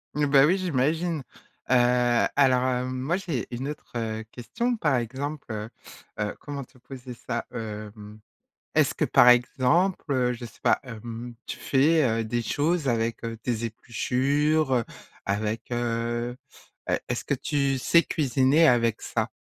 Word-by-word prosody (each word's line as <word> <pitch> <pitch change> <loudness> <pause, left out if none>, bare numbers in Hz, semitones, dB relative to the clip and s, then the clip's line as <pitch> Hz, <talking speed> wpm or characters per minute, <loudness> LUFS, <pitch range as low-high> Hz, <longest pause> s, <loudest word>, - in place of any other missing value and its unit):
Mmh, 150 - +2
bah, 140 0 +6
oui, 185 +5 +3
j'imagine, 160 -1 0 0.5
heu, - - +4 0.6
alors, 130 -3 +4
hem, 130 0 0
moi, 155 +7 0
j'ai 170 -10 -3
une 130 +4 -4
autre, 150 - -8
heu, 110 -1 -3
question 235 - -2
par 150 - +1
exemple, 135 +5 -4
heu 105 +1 -5 0.5
heu, 105 0 -2
comment 140 -3 -6
te 130 - -24
poser 125 -1 -9
ça 120 0 -4
,hem, 105 -2 -7 0.5
est-ce - - +3
que - - +1
par 120 - +5
exemple, 140 +8 +2
heu, 125 -2 +2
je 120 0 -7
sais - - -14
pas, - - +4
hem, 115 0 -8
tu - - -6
fais, 145 +1 +3
heu, - - -2
des 120 +2 -1
choses 150 +5 0
avec, 115 -1 -1
heu, 115 -1 -4
tes 115 0 -2
épluchures, 135 +6 0
heu, 120 -2 +2 0.4
avec, 105 +3 -1
heu 120 0 -2 0.6
heu, - - +2
est-ce - - -2
que - - 0
tu 140 -2 0
sais 170 +7 +4
cuisiner 140 +2 +3
avec 115 -2 +2
ça? 115 0 -2
125 Hz, 155 wpm, -26 LUFS, 115-145 Hz, 0.6 s, bah